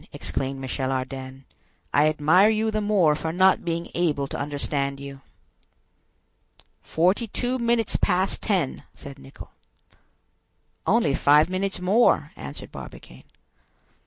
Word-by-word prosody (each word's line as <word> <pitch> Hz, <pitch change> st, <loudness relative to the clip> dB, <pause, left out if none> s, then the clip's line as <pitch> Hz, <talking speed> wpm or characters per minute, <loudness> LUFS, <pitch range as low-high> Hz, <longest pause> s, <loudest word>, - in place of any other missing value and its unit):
exclaimed 135 Hz, 0 st, -3 dB
Michel 130 Hz, 0 st, -3 dB
Ardan; 130 Hz, 0 st, -5 dB, 0.5 s
"I 150 Hz, +2 st, +4 dB
admire 155 Hz, +7 st, +4 dB
you 220 Hz, 0 st, 0 dB
the 215 Hz, 0 st, -1 dB
more 200 Hz, -7 st, +3 dB
for 160 Hz, +2 st, -3 dB
not 185 Hz, +2 st, +3 dB
being 170 Hz, 0 st, -3 dB
able 155 Hz, -5 st, 0 dB
to -, -, -5 dB
understand 140 Hz, -1 st, -3 dB
you." 140 Hz, -1 st, -9 dB, 1.6 s
"Forty 185 Hz, +8 st, +1 dB
two 250 Hz, +4 st, -2 dB
minutes 235 Hz, -1 st, +1 dB
past 185 Hz, 0 st, 0 dB
ten!" 185 Hz, -, -1 dB
said 140 Hz, -1 st, -11 dB
Nicholl. 135 Hz, -, -13 dB, 1.4 s
"Only 215 Hz, -9 st, +2 dB
five 150 Hz, +5 st, +4 dB
minutes 195 Hz, +1 st, -1 dB
more!" 200 Hz, +7 st, +2 dB
answered -, -, -8 dB
Barbicane. -, -, -12 dB
160 Hz, 120 wpm, -24 LUFS, 140-200 Hz, 1.6 s, I